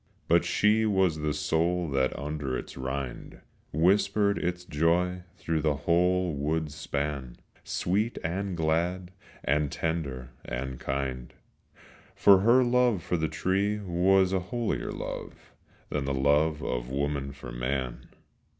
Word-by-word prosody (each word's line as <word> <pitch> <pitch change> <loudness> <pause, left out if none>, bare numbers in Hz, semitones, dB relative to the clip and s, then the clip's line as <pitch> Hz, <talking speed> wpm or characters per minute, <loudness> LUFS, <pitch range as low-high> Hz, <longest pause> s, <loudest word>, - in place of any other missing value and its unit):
But - - +4
she 105 +1 +3
was 95 -6 +2
the 75 0 0
soul 80 +4 0
that 65 -1 0
under 70 -3 -3
its - - -8
rind 65 0 -5 0.3
Whispered 100 +5 +3
its 90 0 -2
joy 90 +4 +1 0.2
through 80 -4 -1
the 75 -1 +1
whole 90 +4 +2
wood's 75 +1 -1
span, 70 -4 -3 0.3
Sweet 105 +6 -1
and 95 +2 -2
glad 85 +3 0 0.3
and 75 0 +1
tender 70 -4 -3
and 65 +1 -5
kind; 65 -2 -3 0.8
For 100 -2 +7
her 120 +6 +5
love 120 -6 +2
for 90 - -1
the 80 -2 0
tree 100 +6 0
was 95 0 +2
a 95 - +2
holier 115 +5 -2
love - - -7 0.4
Than 70 -2 -2
the 70 0 -1
love 75 +3 +2
of - - -3
woman 70 0 -2
for 70 -3 -9
man. 60 +1 -3
80 Hz, 130 wpm, -28 LUFS, 70-95 Hz, 0.8 s, For